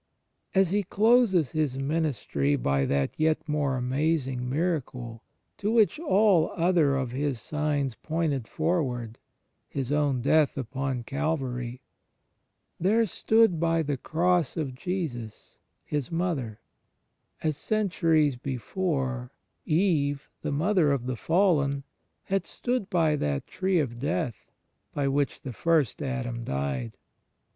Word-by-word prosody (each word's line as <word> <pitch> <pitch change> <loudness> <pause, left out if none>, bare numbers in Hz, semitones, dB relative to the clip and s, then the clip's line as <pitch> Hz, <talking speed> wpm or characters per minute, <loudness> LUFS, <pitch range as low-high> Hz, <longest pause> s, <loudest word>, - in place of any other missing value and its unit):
As 190 -2 +4
He 205 +1 +2
closes 205 - +3
His 150 -4 0
ministry 135 - 0
by 70 +1 +1
that 70 -1 +1
yet 155 0 +1
more 145 -3 0
amazing 130 -1 0
miracle 130 -7 -2 0.4
to 210 - -1
which 230 +5 +3
aU 200 - +4
other 165 -5 +3
of 130 -3 -2
His 135 -1 -1
signs 145 -1 -1
pointed 155 -5 -2
forward 130 -9 -1 0.2
— - - -48
His 135 -1 -3
own 145 -4 +1
Death 150 +1 +3
upon 130 0 -3
Calvary 130 -4 -2 0.4
— - - -49
" - - -50
there 215 +6 +3
stood 220 -2 +3
by 165 0 +2
the 145 -1 -1
Cross 170 +4 +1
of 145 -5 -2
Jesus 130 - -5 0.3
His 145 -2 -3
Mother"* 160 - -2 0.4
— - - -44
as, 155 -2 +1
centuries 165 - +1
before, 130 -1 -2 0.4
Eve, 155 -5 +1
the - - -2
mother 160 +1 +2
of 135 -3 -1
the 130 -1 -2
fallen, 145 - +2 0.4
had 195 0 0
stood 245 -5 -2
by 160 -4 +2
that 70 - -1
Tree 190 -1 0
of 125 -7 -1
Death 125 -5 -3 0.4
by 145 -1 +1
which 140 +1 0
the 130 - -5
First 160 -3 +1
Adam 125 -3 -3
died. 70 - -3
145 Hz, 130 wpm, -27 LUFS, 125-170 Hz, 0.4 s, As